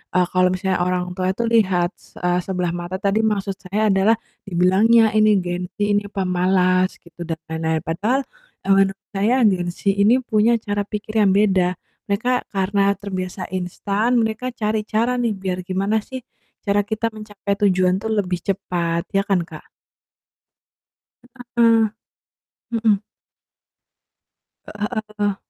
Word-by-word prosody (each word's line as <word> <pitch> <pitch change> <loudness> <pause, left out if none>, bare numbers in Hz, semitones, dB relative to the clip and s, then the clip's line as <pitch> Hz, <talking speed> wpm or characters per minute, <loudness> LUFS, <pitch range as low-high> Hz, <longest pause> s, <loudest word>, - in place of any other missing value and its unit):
eee, 180 0 +4
kalau 185 0 +4
misalnya 185 0 -1
orang 180 0 -1
tua 185 -1 -1
itu 235 - -1
lihat 190 -7 +2
se - - -20
eee, 180 0 +2
sebelah 180 -1 -2
mata 175 +1 -4
tadi 200 +1 0
maksud 205 -3 0
saya 205 +4 0
adalah 195 +4 +4 0.3
dibilangnya 195 +6 +4
ini 215 0 +5
Gen 175 0 -3
Z, - - -89
ini 205 0 +2
pemalas 185 0 +2
gitu, 170 0 -15
dan 165 -1 -3
lain-lain. 160 -1 -1
Padahal, 210 - 0 0.4
eee, 195 - +2
menurut 195 0 +2
saya, 210 +6 +2 0.2
Gen 180 -2 -1
Z - - -14
ini 205 +4 +4
punya 220 0 +3
cara 205 -1 -1
pikir 210 +1 -6
yang 195 -2 +4
beda. 185 -3 +2 0.3
Mereka 245 +5 0
karena 195 +1 +1
terbiasa 185 -2 -5
instan, 200 +5 -1
mereka 225 +2 -1
cari 215 -1 0
cara 230 +3 +1
nih, 230 -3 +1
biar 190 -1 -3
gimana 195 +4 0
sih 260 +4 -7 0.5
cara 205 0 +2
kita 220 +2 -2
mencapai 205 -2 -4
tujuan 185 -2 +3
tuh 220 - -3
lebih 185 -5 0
cepat. 170 -3 -1
Ya 195 - +4
kan, 195 -2 +1
Kak? 155 -1 -12 1.9
Heeh. 230 -1 +5 0.9
Mhm. 220 -3 +2 1.7
Heeh 210 0 -4 0.3
heeh. 205 -1 +1
195 Hz, 145 wpm, -21 LUFS, 180-215 Hz, 1.9 s, ini